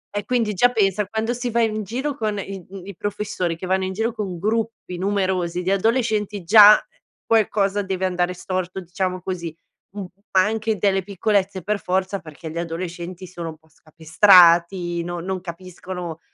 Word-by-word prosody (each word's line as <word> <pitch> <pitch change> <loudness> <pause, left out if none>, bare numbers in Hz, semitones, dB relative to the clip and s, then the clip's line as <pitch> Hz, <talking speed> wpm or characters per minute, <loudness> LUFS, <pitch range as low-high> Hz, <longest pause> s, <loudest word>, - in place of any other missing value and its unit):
E 205 - -2
quindi 235 -4 0
già 245 +6 +4
pensa 205 -3 +1
quando 220 +3 -2
si 245 0 -3
va 235 0 +1
in 215 -1 -1
giro 255 +8 -3
con 215 -5 -2
i, 195 -1 -6
ehm, 190 -1 -10
i 200 -1 -9
professori 205 -4 -3
che 185 - -7
vanno 190 +1 0
in 190 - -4
giro 225 +4 -1
con 200 -6 -4
gruppi 220 0 -2
numerosi 185 -3 -1
di 185 - 0
adolescenti, 210 -1 0
già, 210 +3 +9
ehm, - - -11 0.4
qualcosa 205 -2 +2
deve 190 -1 -2
andare 180 -1 0
storto, 185 +1 -4
diciamo 185 +1 -3
così. 170 -4 -5 0.4
Mh, - - -5
ma 190 0 -1
anche 220 0 -1
delle 195 -1 +1
piccolezze 200 -1 -1
per 210 +2 -1
forza 190 +1 -1
perché 155 0 -10
gli 165 - -4
adolescenti 175 +1 -6
sono 175 -2 -7
un 160 - -10
po' 160 0 -30
scapestrati, 170 +2 +4
no 175 0 -5
non 185 +1 -4
capiscono 180 -1 -7
190 Hz, 175 wpm, -22 LUFS, 175-210 Hz, 0.4 s, già